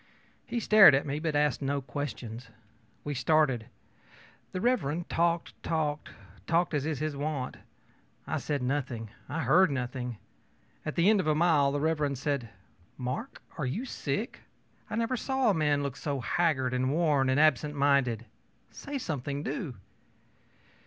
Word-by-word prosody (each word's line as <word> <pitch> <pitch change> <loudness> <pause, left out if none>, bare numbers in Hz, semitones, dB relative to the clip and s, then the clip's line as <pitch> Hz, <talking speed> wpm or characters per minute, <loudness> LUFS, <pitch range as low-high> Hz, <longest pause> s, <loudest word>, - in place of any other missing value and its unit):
He 240 - -1
stared 215 -8 +8
at 135 - 0
me, 145 +1 -2
but 155 -1 -2
asked 145 -3 +2
no 140 +1 0
questions. 125 -3 -6 0.6
We 145 - -3
started. 135 -3 +2 0.8
Mr. 185 - 0
talked, 170 0 0
talked, 155 -2 -1 0.4
talked 170 +1 +2
as 145 0 0
is 155 -3 -1
his 155 0 -2
wont. 140 -2 -3 0.7
I - - -2
said 145 -3 -2
nothing; 125 -5 -2 0.2
I 160 +4 -2
heard 185 0 +5
nothing. 125 -3 -3 0.7
At 155 - -3
the 170 +2 +3
end 215 -1 +5
of 175 - -1
a 155 - +3
mile, 155 -4 +4
Mr. 145 -1 0
said 135 -3 -2 0.5
ōMark, 130 - -4 0.2
are 145 - 0
you 210 - -3
sick? - - -3 0.5
I - - -3
never 230 +2 0
saw 265 -1 +1
a - - +1
man 150 -4 +1
look 140 -3 -3
so 140 -2 -3
haggard 130 -2 +1
and 130 +1 +1
worn 150 -4 +2
and 130 +2 +3
absent 150 -1 +3
minded. 140 -5 +2 0.5
Say 285 -1 -6
something, 145 - -3
do! 140 -1 -4
145 Hz, 150 wpm, -29 LUFS, 135-165 Hz, 0.8 s, stared